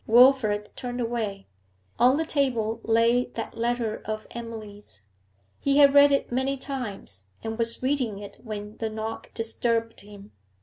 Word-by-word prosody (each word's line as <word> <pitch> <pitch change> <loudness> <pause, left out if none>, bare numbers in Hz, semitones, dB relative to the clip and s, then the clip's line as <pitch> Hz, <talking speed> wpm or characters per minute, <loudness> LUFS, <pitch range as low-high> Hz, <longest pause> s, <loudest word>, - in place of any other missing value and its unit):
Wilfrid 225 -3 +5
turned 245 0 -5
away. 225 -5 -2 0.5
On 255 +3 +5
the 320 - 0
table 235 -7 0
lay 230 +2 +3
that 225 - -5
letter 235 -1 -1
of 215 0 -4
Emily's; 215 - -8 0.6
he 280 0 +2
had 280 -1 +7
read 285 0 +7
it 275 - +1
many 265 +2 0
times, 215 - -6 0.2
and 225 0 -3
was 230 +1 +1
reading 255 -6 0
it 200 0 -10
when 210 -2 -7
the 225 - -2
knock 220 +1 -6
disturbed 230 0 -1
him. 205 0 -13
230 Hz, 145 wpm, -26 LUFS, 215-250 Hz, 0.6 s, had